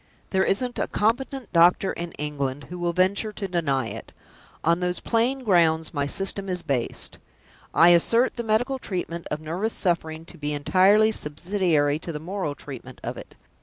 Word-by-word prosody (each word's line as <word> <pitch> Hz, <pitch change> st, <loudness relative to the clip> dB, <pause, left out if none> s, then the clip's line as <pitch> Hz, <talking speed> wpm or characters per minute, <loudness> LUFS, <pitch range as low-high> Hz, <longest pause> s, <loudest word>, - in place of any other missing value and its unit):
There 190 Hz, -1 st, +3 dB
isn't 245 Hz, +5 st, 0 dB
a -, -, 0 dB
competent 245 Hz, +2 st, -1 dB
doctor 175 Hz, +3 st, +4 dB
in 170 Hz, 0 st, -5 dB
England 145 Hz, -2 st, -3 dB
who 180 Hz, -, -6 dB
will 175 Hz, 0 st, 0 dB
venture 190 Hz, +5 st, +1 dB
to 200 Hz, -1 st, -4 dB
deny 140 Hz, -8 st, 0 dB
it! -, -, -8 dB, 0.5 s
On 170 Hz, +1 st, +3 dB
those 180 Hz, -1 st, -1 dB
plain 245 Hz, +4 st, 0 dB
grounds 165 Hz, -6 st, +2 dB
my 145 Hz, -2 st, -1 dB
System 195 Hz, +4 st, -1 dB
is 180 Hz, -1 st, -2 dB
based. 130 Hz, -4 st, -2 dB, 0.5 s
I 170 Hz, -, +6 dB
assert 230 Hz, +9 st, +4 dB
the 235 Hz, -, -3 dB
medical 245 Hz, +5 st, 0 dB
treatment 175 Hz, -6 st, -4 dB
of 150 Hz, -, -2 dB
nervous 180 Hz, +8 st, -2 dB
suffering 165 Hz, -3 st, -1 dB
to 170 Hz, -, -13 dB
be 150 Hz, 0 st, -2 dB
entirely 190 Hz, +9 st, +4 dB
subsidiary 155 Hz, -3 st, 0 dB
to 170 Hz, -, -6 dB
the 150 Hz, -, -5 dB
moral 170 Hz, -2 st, -4 dB
treatment 130 Hz, -3 st, -10 dB
of -, -, -4 dB
it. -, -, -11 dB
175 Hz, 170 wpm, -25 LUFS, 155-205 Hz, 0.5 s, I